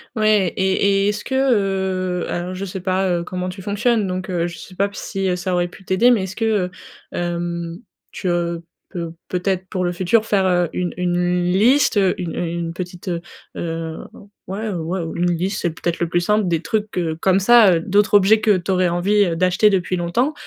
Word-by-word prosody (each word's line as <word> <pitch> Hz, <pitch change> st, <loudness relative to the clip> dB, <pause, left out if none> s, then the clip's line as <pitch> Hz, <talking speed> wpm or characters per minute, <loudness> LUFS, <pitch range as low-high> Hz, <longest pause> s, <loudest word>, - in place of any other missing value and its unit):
Ouais 215 Hz, -3 st, +3 dB
et 190 Hz, 0 st, +1 dB
et 195 Hz, 0 st, +2 dB
et -, -, +2 dB
est-ce 210 Hz, 0 st, -3 dB
que 265 Hz, -, -3 dB
heu, 190 Hz, -7 st, 0 dB
alors, 180 Hz, +1 st, -3 dB
je 195 Hz, -, -4 dB
sais 190 Hz, 0 st, -6 dB
pas, 185 Hz, +1 st, 0 dB
heu, 175 Hz, -1 st, 0 dB
comment 180 Hz, +1 st, -4 dB
tu 190 Hz, +1 st, -8 dB
fonctionnes, 205 Hz, +2 st, +1 dB
donc, 185 Hz, +1 st, -4 dB
heu, 175 Hz, -2 st, 0 dB
je 175 Hz, -1 st, -8 dB
sais 185 Hz, -, -12 dB
pas 200 Hz, +2 st, +1 dB
si 195 Hz, -2 st, -2 dB
ça 180 Hz, +1 st, -2 dB
aurait 175 Hz, 0 st, +1 dB
pu 185 Hz, -, -15 dB
t'aider, 200 Hz, +7 st, +3 dB
mais 210 Hz, -6 st, +2 dB
est-ce 190 Hz, 0 st, -6 dB
que, 225 Hz, -, -1 dB
heu, 205 Hz, -5 st, +1 dB, 0.4 s
hem, 170 Hz, 0 st, -3 dB, 0.3 s
tu, 190 Hz, -, -5 dB
heu, 170 Hz, -1 st, -1 dB, 0.3 s
peux 170 Hz, -3 st, -5 dB, 0.2 s
peut-être 185 Hz, 0 st, -2 dB
pour 185 Hz, -, -2 dB
le 175 Hz, -, 0 dB
futur 190 Hz, +5 st, +1 dB
faire, 200 Hz, -3 st, +2 dB
heu, 175 Hz, -2 st, +2 dB
une 180 Hz, -1 st, -2 dB
une 180 Hz, 0 st, 0 dB
liste, 240 Hz, +6 st, +3 dB
heu, 190 Hz, -2 st, +3 dB
une 170 Hz, -2 st, -4 dB
une 170 Hz, -1 st, -3 dB
petite, 180 Hz, +1 st, -6 dB
heu, 170 Hz, -1 st, -2 dB, 0.4 s
heu, 165 Hz, -1 st, -4 dB, 0.5 s
ouais, 210 Hz, +4 st, -4 dB
ouais, 175 Hz, +1 st, -3 dB
une 175 Hz, 0 st, +1 dB
liste, 185 Hz, +4 st, -2 dB
c'est 170 Hz, -, 0 dB
peut-être 170 Hz, +1 st, -3 dB
le 170 Hz, -, 0 dB
plus 175 Hz, +2 st, +1 dB
simple 210 Hz, +2 st, +1 dB
des 165 Hz, -2 st, 0 dB
trucs 215 Hz, +4 st, -1 dB
que 170 Hz, -3 st, -1 dB
comme 190 Hz, +3 st, +2 dB
ça, 220 Hz, -2 st, +7 dB
heu, -, -, +1 dB
d'autres 205 Hz, +4 st, +2 dB
objets 205 Hz, +2 st, +6 dB
que 210 Hz, -2 st, +4 dB
tu 180 Hz, +2 st, -3 dB
aurais 185 Hz, -1 st, +2 dB
envie 180 Hz, +1 st, +2 dB
d'acheter 185 Hz, +4 st, +3 dB
depuis 185 Hz, -2 st, 0 dB
longtemps, 175 Hz, -, 0 dB
185 Hz, 210 wpm, -20 LUFS, 175-200 Hz, 0.5 s, ça